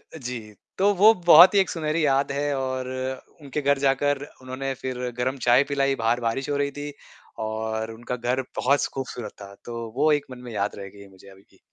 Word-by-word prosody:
अ, - - -6
जी। 120 -6 -7 0.2
तो 200 +2 +3
वो 210 +4 +7
बहुत 175 +3 +9
ही - - +6
एक 190 - +2
सुनहरी 155 -1 -1
याद 140 0 +2
है 145 +1 -1
और 130 -1 -3 0.5
उनके 145 +1 -4
घर 140 0 +2
जाकर 140 +1 +1 0.2
उन्होंने 130 +1 -4
फ़िर 125 -1 -3
गरम 130 +2 -1
चाय 125 +3 +6
पिलाई। 140 -1 +1
बाहर 115 0 +1
बारिश 120 +4 -2
हो 145 - 0
रही 140 0 0
थी 145 +1 -6 0.5
और 110 0 -3
उनका 120 +2 -5
घर 125 +2 -1
बहुत 140 +3 +2
ख़ूबसूरत 125 -5 -5
था। 100 0 -10
तो 115 -1 -6
वो 150 +3 +3
एक 145 -1 +1
मन 125 - -8
में - - -7
याद 100 -1 -2
रहेगी 100 0 -10
मुझे 95 0 -18
अभी 95 0 -17
भी। - - -25
130 Hz, 205 wpm, -24 LUFS, 115-145 Hz, 0.5 s, बहुत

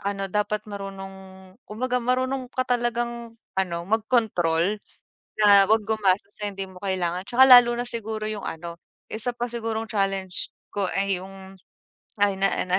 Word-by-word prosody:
ano 195 0 -2
dapat 210 +1 -1
marunong 195 -2 -9 0.2
kumbaga, 250 +4 -1
marunong 255 +1 -1
ka 255 -1 -1
talagang 235 -1 -2 0.2
ano 170 -2 -1
magkontrol 210 -4 +1 0.6
na 200 -2 +7
huwag 220 -2 +3
gumastos 205 -2 +1
sa 210 -1 -3
hindi 195 0 -5
mo 185 0 -14
kailangan. 185 -1 -1
Tsaka, 255 +5 +5
lalo 245 -2 +9
na 245 - -1
siguro 220 -2 -4
yung 210 -2 -5
ano 170 +1 -6 0.3
isa 225 +3 -3
pa 240 - -1
sigurong 225 -1 -3
challenge 195 -3 -1 0.2
ko 200 -2 -1
ay 195 -1 0
yung 190 0 -11 0.7
ay 200 -1 +3
na, 195 - +4
ah, - - -1
na 180 - +1
205 Hz, 155 wpm, -25 LUFS, 190-235 Hz, 0.7 s, lalo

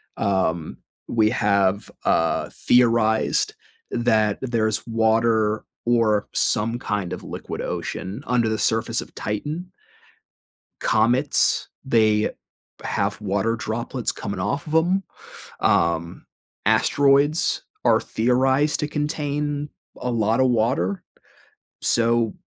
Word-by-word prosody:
Um, 85 -5 -1 0.3
we 110 -2 +2
have, 100 -4 +1 0.2
uh, 80 0 +1
theorized 115 -3 +2 0.4
that 110 -3 +2
there's 110 -4 0
water 110 -1 +2 0.2
or 115 -3 +2
some 115 +3 +1
kind 105 -6 -3
of 90 - -7
liquid - - -6
ocean 95 +3 -5
under 120 -2 +2
the 110 0 0
surface 115 +1 0
of - - -12
Titan 150 - -4 1.1
comets, 125 +6 +2 0.2
they 110 -4 +3 0.5
have - - -1
water 100 +4 0
droplets 115 +2 -3
coming 100 -1 -5
off 140 +12 -2
of 155 - -3
'em. 180 +4 +2 0.6
Um, 85 0 +1 0.4
asteroids 145 +3 +3 0.2
are - - +4
theorized 130 +5 +1
to 150 - 0
contain 150 -1 -2 0.3
a 125 - -3
lotta 115 +3 +2
water. 125 - +1 0.8
So, 115 -1 +2
115 Hz, 100 wpm, -23 LUFS, 105-130 Hz, 1.1 s, are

